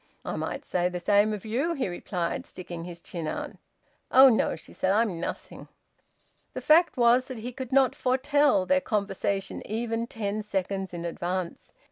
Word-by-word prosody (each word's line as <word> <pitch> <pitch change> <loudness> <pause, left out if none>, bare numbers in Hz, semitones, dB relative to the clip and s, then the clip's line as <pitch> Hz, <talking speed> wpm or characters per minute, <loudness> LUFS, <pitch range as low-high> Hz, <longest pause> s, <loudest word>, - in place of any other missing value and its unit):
"I - - -3
might - - -4
say 180 0 0
the 180 0 -4
same 205 +4 +3
of 210 -1 -5
you," 270 +10 -1
he 265 - -1
replied, 175 -1 -3
sticking 175 -2 -8
his 175 -1 -8
chin 165 -3 -5
out. - - -4 0.6
"Oh 265 +1 +8
no!" 225 - +2
she - - -13
said. 185 - -1
"I'm 205 -4 +1
nothing." - - -6 0.9
The - - -4
fact 330 +1 +4
was 245 +2 +4
that 255 - -6
he 235 +3 -6
could 260 0 -7
not 265 -1 +4
foretell 265 -4 +2
their 275 +6 +3
conversation 200 -3 -2
even 230 +1 -2
ten 215 -2 -3
seconds 195 -2 -3
in 170 0 -5
advance. 175 +1 -4
210 Hz, 170 wpm, -27 LUFS, 180-255 Hz, 0.9 s, Oh